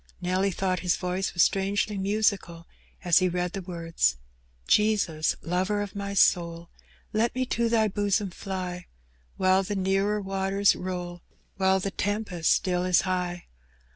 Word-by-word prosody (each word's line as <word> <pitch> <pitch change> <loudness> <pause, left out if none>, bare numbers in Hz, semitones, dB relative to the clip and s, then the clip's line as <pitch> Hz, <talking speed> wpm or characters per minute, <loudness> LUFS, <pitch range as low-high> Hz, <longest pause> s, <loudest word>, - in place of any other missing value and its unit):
Nelly 185 +2 0
thought 185 0 -1
his 180 0 +1
voice 180 +1 -3
was 175 - +5
strangely 200 +2 0
musical 195 -4 -1 0.4
as 175 -1 +5
he 185 -1 +2
read 180 0 -2
the 195 - -4
words 170 - -1 0.2
— - - -32
Jesns, 200 -8 +2
lover 185 +5 0
of 205 - -8
my 200 0 -4
soul, 170 -3 +2 0.4
Let 225 +3 +1
me 255 0 0
to 235 -1 0
Thy 225 -2 +3
bosom 205 -1 0
fly, 180 -1 -5 0.5
While 185 0 +3
the 205 +2 -4
nearer 195 +2 +1
waters 195 0 +1
roll, 180 -1 -5 0.4
While 190 0 +3
the 195 +1 -3
tempest 205 -5 -1
still 180 -1 +1
is 180 -1 +3
high. 180 -1 -2
190 Hz, 150 wpm, -27 LUFS, 180-200 Hz, 0.5 s, was